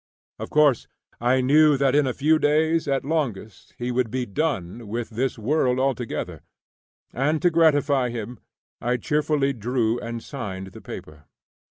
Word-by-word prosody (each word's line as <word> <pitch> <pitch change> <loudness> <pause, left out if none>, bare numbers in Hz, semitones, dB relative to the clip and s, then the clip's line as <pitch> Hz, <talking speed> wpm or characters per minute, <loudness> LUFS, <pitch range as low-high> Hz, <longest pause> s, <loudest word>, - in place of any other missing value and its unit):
Of - - -6
course, 150 -5 +3 0.3
I 125 +2 +2
knew 150 +2 +5
that 135 -1 +2
in 145 -1 +3
a 130 - -1
few 155 +3 +3
days 155 +2 +2
at 135 -1 0
longest 120 - -3
he 120 +1 -3
would 125 -1 0
be 125 +2 -2
"done" 115 - -3
with 115 +3 -4
this 125 +4 -1
world 125 +2 +1
altogether, 130 -3 -2 0.7
and, 150 +5 +1
to 175 - +4
gratify 145 -5 +3
him, 120 +1 -6 0.4
I 125 +1 0
cheerfully 150 0 0
drew 120 0 -1
and 115 -1 -6
signed 95 -8 -6
the - - -12
paper. 75 -1 -10
130 Hz, 155 wpm, -24 LUFS, 115-150 Hz, 0.7 s, knew